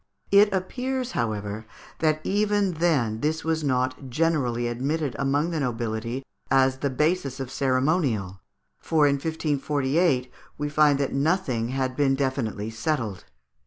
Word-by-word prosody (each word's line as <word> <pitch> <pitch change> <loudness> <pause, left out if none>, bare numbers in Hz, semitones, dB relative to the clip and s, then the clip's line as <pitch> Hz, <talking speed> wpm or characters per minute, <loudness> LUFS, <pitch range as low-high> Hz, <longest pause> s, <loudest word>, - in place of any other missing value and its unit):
It 205 +1 +6
appears, 250 +7 -2
however, 110 -1 -3 0.3
that 155 -1 +2
even 205 -1 +1
then 145 -10 +1
this 155 +4 -1
was 160 -1 0
not 130 0 -1
generally 125 -5 +1
admitted 140 +4 -2
among 145 +5 +1
the 160 - -1
nobility 120 -1 -2 0.3
as 130 -1 +3
the 140 - 0
basis 140 -1 0
of 135 -1 -5
ceremonial, 130 - 0 0.4
for 155 -2 +2
in 140 -1 +3
1548 145 -2 0 0.3
we 145 0 -2
find 150 -1 +4
that 140 -1 -1
nothing 140 -6 +1
had 130 0 -2
been 135 -1 +2
definitely 125 -6 -2
settled. 115 - -2
140 Hz, 130 wpm, -25 LUFS, 125-160 Hz, 0.4 s, It